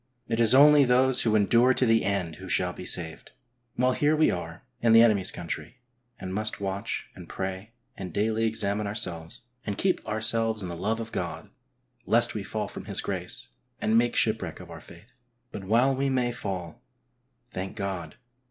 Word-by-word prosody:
It 115 0 -1
is 115 +1 +5
only 145 +1 +7
those 130 0 +4
who 110 -2 +2
endure 120 +5 +4
to 130 - +3
the 115 -1 +3
end 90 -5 -2
who 95 -1 -10
shall 90 -1 +1
be 90 - -8
saved. 80 -2 -2 0.4
While 125 +1 +2
here 150 +4 +2
we 155 0 +3
are 85 -1 -6 0.2
in 115 -1 +4
the 115 0 +8
enemy's 100 -5 +3
country, 85 +5 -6 0.4
and 95 0 -6
must 110 +2 -1
watch 100 0 -4
and - - -12
pray 95 +3 -5 0.2
and 95 -2 -7
daily 110 +4 0
examine 105 -1 -1
ourselves, 85 -4 -1 0.2
and 105 -2 -4
keep 190 -2 0
ourselves 110 0 0
in 90 - -5
the 85 - -5
love 105 +6 -2
of 115 -1 -6
God - - -5 0.6
lest - - +3
we - - -3
fall - - -4
from - - -9
His - - -4
grace, - - -3 0.3
and 110 - +1
make 120 +1 +3
shipwreck 110 -7 0
of 90 -2 -11
our 80 -2 -9
faith. 85 +11 -16 0.4
But 95 - -7
while 120 +7 +3
we 135 +1 0
may 125 -2 +1
fall, 95 -7 -5 0.7
thank 95 +1 -5
God 100 -4 -4
105 Hz, 185 wpm, -27 LUFS, 95-115 Hz, 0.7 s, the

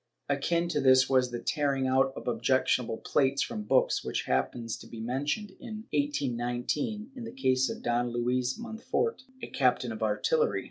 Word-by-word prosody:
Akin 170 +5 +1
to 150 -4 0
this 130 -1 +6
was 130 -2 +3
the 120 - -4
tearing 140 -1 0
out 130 +1 +3
of - - -8
objectionable 120 0 +1
plates 135 -1 +1
from 105 - -4
books, - - +2
which - - -2
happens 65 - -1
to - - -12
be 115 - -9
mentioned, 140 - -2
in 220 -3 -7
1819, 145 - -1
in 250 - -7
the 230 - -6
case 130 - +2
of - - -6
Don 120 +1 +1
Luis 125 +2 0
Monfort, 235 - -2 0.2
a - - -3
captain 125 -2 +1
of 110 - -7
artillery. 465 - +1
130 Hz, 170 wpm, -29 LUFS, 120-150 Hz, 0.2 s, this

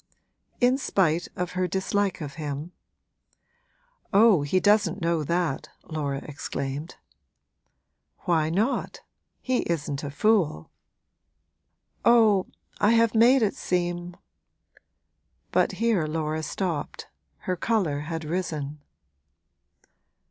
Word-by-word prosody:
'In 250 +2 +3
spite 175 - +1
of 180 -1 -3
her 185 0 -1
dislike 190 +1 -1
of 145 -2 -5
him?' 150 +1 -5 1.4
'Oh, 205 -4 +6
he 145 +6 +1
doesn't 205 -2 +3
know 165 -2 0
that!' 170 -2 -1
Laura 145 -3 -3
exclaimed. 145 +1 -5 1.3
'Why 160 -4 +1
not? 215 +11 -1 0.4
he 255 -1 0
isn't 150 -4 -2
a 145 - -3
fool.' 160 - +1 1.3
'Oh, 220 -5 +5 0.3
I 210 +2 +4
have 230 -1 +3
made 240 +3 +5
it 205 - +1
seem 175 0 -2 0.6
' - - -48
But - - +2
here 220 -9 +1
Laura 155 0 -2
stopped; 165 -2 -3 0.4
her 185 - -2
colour 180 -7 0
had 160 +1 -5
risen. 150 -4 -3
175 Hz, 105 wpm, -26 LUFS, 155-205 Hz, 1.4 s, Oh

